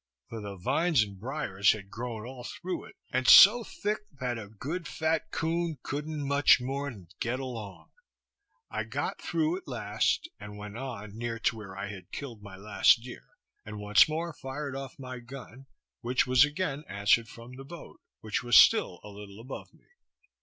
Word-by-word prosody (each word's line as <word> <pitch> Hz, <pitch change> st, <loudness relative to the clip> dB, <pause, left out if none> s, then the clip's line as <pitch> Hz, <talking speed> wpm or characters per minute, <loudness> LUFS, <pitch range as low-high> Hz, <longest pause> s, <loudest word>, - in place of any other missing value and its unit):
For 115 Hz, -1 st, -6 dB
the 100 Hz, -1 st, -6 dB
vines 140 Hz, -, +2 dB
and 100 Hz, -2 st, -9 dB
briers 110 Hz, -5 st, +1 dB
had 100 Hz, -2 st, -10 dB
grown 115 Hz, -2 st, -5 dB
all 125 Hz, 0 st, -9 dB
through 180 Hz, +7 st, -5 dB
it, -, -, -15 dB, 0.2 s
and 130 Hz, 0 st, 0 dB
so 230 Hz, +5 st, +10 dB
thick, 210 Hz, 0 st, -3 dB, 0.2 s
that 125 Hz, -2 st, -2 dB
a 105 Hz, -, -8 dB
good 150 Hz, -, -5 dB
fat 160 Hz, 0 st, -1 dB
coon 165 Hz, -1 st, -1 dB
couldn't 150 Hz, 0 st, -4 dB
much 140 Hz, 0 st, +5 dB
more 135 Hz, +3 st, -3 dB
than 95 Hz, -9 st, -12 dB
get 120 Hz, +2 st, -1 dB
along. 115 Hz, -8 st, -7 dB, 0.8 s
I -, -, -2 dB
got -, -, -3 dB
through 320 Hz, +2 st, 0 dB
at 375 Hz, -, -12 dB
last, 330 Hz, -, 0 dB
and 105 Hz, 0 st, -9 dB
went 105 Hz, 0 st, -8 dB
on 115 Hz, -5 st, -6 dB
near 115 Hz, 0 st, -3 dB
to -, -, +1 dB
where 100 Hz, -3 st, -9 dB
I 100 Hz, -, -3 dB
had 95 Hz, -4 st, -10 dB
killed 120 Hz, -7 st, -7 dB
my 100 Hz, -2 st, -10 dB
last 105 Hz, +3 st, +4 dB
deer, 125 Hz, -1 st, -10 dB, 0.4 s
and 105 Hz, 0 st, -8 dB
once 105 Hz, +7 st, +5 dB
more 165 Hz, +2 st, -3 dB
fired 135 Hz, 0 st, -6 dB
off 135 Hz, -1 st, -7 dB
my 130 Hz, -1 st, -7 dB
gun, 130 Hz, +1 st, -11 dB, 0.3 s
which 125 Hz, +1 st, +1 dB
was 130 Hz, +1 st, +6 dB
again 150 Hz, -1 st, -2 dB
answered 100 Hz, +3 st, +3 dB
from 115 Hz, +2 st, -12 dB
the 135 Hz, -, -9 dB
boat, 170 Hz, +5 st, -11 dB, 0.2 s
which 110 Hz, -1 st, -2 dB
was 120 Hz, 0 st, +5 dB
still 90 Hz, -, +6 dB
a 105 Hz, -, -9 dB
little 100 Hz, 0 st, -11 dB
above 125 Hz, +4 st, -8 dB
me. -, -, -26 dB
125 Hz, 180 wpm, -29 LUFS, 105-145 Hz, 0.8 s, so